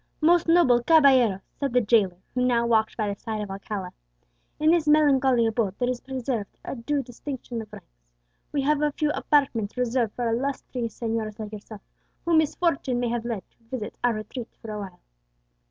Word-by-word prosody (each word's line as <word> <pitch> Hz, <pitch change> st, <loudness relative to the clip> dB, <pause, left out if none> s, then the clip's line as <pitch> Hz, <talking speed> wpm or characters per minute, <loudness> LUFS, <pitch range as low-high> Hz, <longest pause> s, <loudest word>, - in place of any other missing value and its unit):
"Most 340 Hz, +2 st, +4 dB
noble 330 Hz, -8 st, +5 dB
caballero," 260 Hz, -, +5 dB, 0.2 s
said 275 Hz, -3 st, -1 dB
the 250 Hz, -, +5 dB
jailer, 205 Hz, -5 st, +2 dB, 0.2 s
who 250 Hz, -, 0 dB
now 240 Hz, -2 st, +2 dB
walked 220 Hz, -2 st, +2 dB
by 215 Hz, -2 st, 0 dB
the 200 Hz, -1 st, -4 dB
side 220 Hz, -2 st, -4 dB
of 205 Hz, -2 st, -5 dB
Alcala, 195 Hz, -1 st, -5 dB, 0.7 s
"in 310 Hz, +1 st, +4 dB
this 335 Hz, -3 st, +2 dB
melancholy 270 Hz, -5 st, +4 dB
abode 220 Hz, -3 st, 0 dB
there 250 Hz, 0 st, 0 dB
is 245 Hz, -, -5 dB
preserved 255 Hz, -5 st, -4 dB
a -, -, -4 dB
due 275 Hz, +4 st, -1 dB
distinction 245 Hz, -1 st, -6 dB
of 215 Hz, -1 st, -12 dB
ranks. -, -, -14 dB, 0.5 s
We 280 Hz, -2 st, 0 dB
have 295 Hz, +1 st, +2 dB
a 300 Hz, 0 st, +2 dB
few 300 Hz, 0 st, 0 dB
apartments 255 Hz, -9 st, +1 dB
reserved 245 Hz, -3 st, 0 dB
for 240 Hz, -1 st, -1 dB
illustrious 245 Hz, -1 st, -3 dB
señors 225 Hz, -2 st, -2 dB
like 215 Hz, -2 st, -6 dB
yourself, 210 Hz, -1 st, -9 dB, 0.4 s
whom 335 Hz, -2 st, +4 dB
misfortune 290 Hz, -5 st, 0 dB
may 245 Hz, -1 st, 0 dB
have 235 Hz, 0 st, -2 dB
led 230 Hz, -5 st, -3 dB
to 235 Hz, -, -35 dB
visit 250 Hz, -5 st, -5 dB
our 240 Hz, -2 st, +3 dB
retreat 225 Hz, +3 st, -7 dB
for 225 Hz, -, -8 dB
awhile." 200 Hz, -4 st, -7 dB
240 Hz, 185 wpm, -25 LUFS, 215-275 Hz, 0.7 s, noble